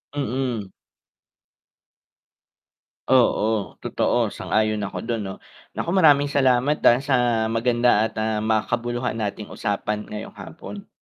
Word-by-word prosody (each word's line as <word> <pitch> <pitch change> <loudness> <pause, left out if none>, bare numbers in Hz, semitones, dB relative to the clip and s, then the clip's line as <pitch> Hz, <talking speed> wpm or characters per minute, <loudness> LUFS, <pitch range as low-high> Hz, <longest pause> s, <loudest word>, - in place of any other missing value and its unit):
Mm. 125 -6 -2 2.4
Oo, 110 -5 +2
totoo, - - +1
sang-ayon 110 -1 0
ako 100 - -5
dun 115 -2 -2
'no. 95 -1 -5 0.4
Nako, - - -2
maraming 145 -6 +5
salamat 130 +1 +3
dahil 120 +2 +6
sa 120 -4 +2
maganda 120 -1 +2
at, - - -21
ah, 110 -1 -1
makabuluhan 120 +3 -1
nating 105 -1 -4
usapan 105 0 -2
ngayong 105 0 -7
hapon. 200 +5 -10
120 Hz, 110 wpm, -23 LUFS, 110-130 Hz, 2.4 s, dahil